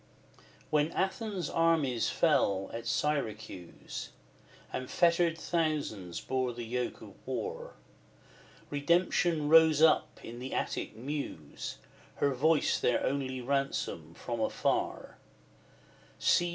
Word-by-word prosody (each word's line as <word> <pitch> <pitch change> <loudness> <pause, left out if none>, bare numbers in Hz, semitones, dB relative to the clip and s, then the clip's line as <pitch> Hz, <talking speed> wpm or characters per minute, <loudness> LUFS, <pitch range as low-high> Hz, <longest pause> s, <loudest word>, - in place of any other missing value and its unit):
XVI. - - -24 0.3
When 150 +1 +2
Athens' 190 -2 -1
armies 160 -8 +2
fell 95 -1 +2
at 115 0 -5
Syracuse, 110 - -3 0.6
And 130 0 -4
fettered 170 -1 +3
thousands 150 - -1
bore 130 -2 -1
the 120 0 -6
yoke 125 +2 -3
of - - -11
war, 485 +2 -4 1.0
Redemption 165 +1 +2
rose 160 -1 +7
up 160 0 +4
in 120 +1 -8
the 130 +1 -5
Attic - - -2
Muse, 125 - -5 0.4
Her 140 -1 +1
voice 155 +4 +3
their 125 - +2
only 130 -2 -1
ransom 125 - -2
from 120 -2 -4
afar: 110 - -1 1.0
See! 175 0 +3
140 Hz, 110 wpm, -31 LUFS, 120-165 Hz, 1.0 s, rose